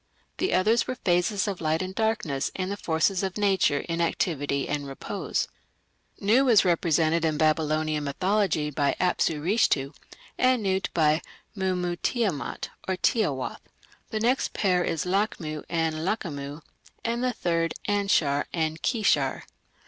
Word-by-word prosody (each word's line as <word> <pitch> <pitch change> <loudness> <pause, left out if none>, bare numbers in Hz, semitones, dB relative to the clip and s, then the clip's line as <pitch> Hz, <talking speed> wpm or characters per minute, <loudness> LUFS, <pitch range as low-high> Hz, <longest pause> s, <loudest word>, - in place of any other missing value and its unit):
The 375 - +1
others 220 +5 +3
were 255 - -2
phases 195 +1 +1
of 195 -4 -3
light 160 +2 +1
and 185 0 -5
darkness 220 - 0
and 185 0 -2
the - - -1
forces 175 +1 +1
of 190 0 -3
nature 190 -8 +2
in 170 0 -3
activity 145 -4 0
and 145 -1 -2
repose. 135 - -3 0.7
Nu 245 +7 +3
is 220 -5 +6
represented 165 -1 +2
in 155 -2 +1
Babylonian 155 -1 +1
mythology 175 0 0
by 140 0 +1
Apsu 175 -3 +1
Rishtu, 160 -8 +2 0.5
and 255 -3 +3
Nut 190 -1 0
by 155 -1 +3 0.3
Mummu 180 -2 -1
Tiamat 205 - -1 0.2
or 190 -1 0
Tiawath; 150 - 0 0.5
the 215 - -2
next 245 +4 +1
pair 180 -3 +2
is 165 -1 -1
Lachmu 180 -5 -1
and 165 -1 0
Lachamu, 155 -5 -3 0.4
and 235 +1 -1
the 255 - +2
third, 165 -5 -1
Anshar 195 -9 +2
and 160 -1 -2
Kishar. 150 - +1
175 Hz, 140 wpm, -26 LUFS, 155-205 Hz, 0.7 s, is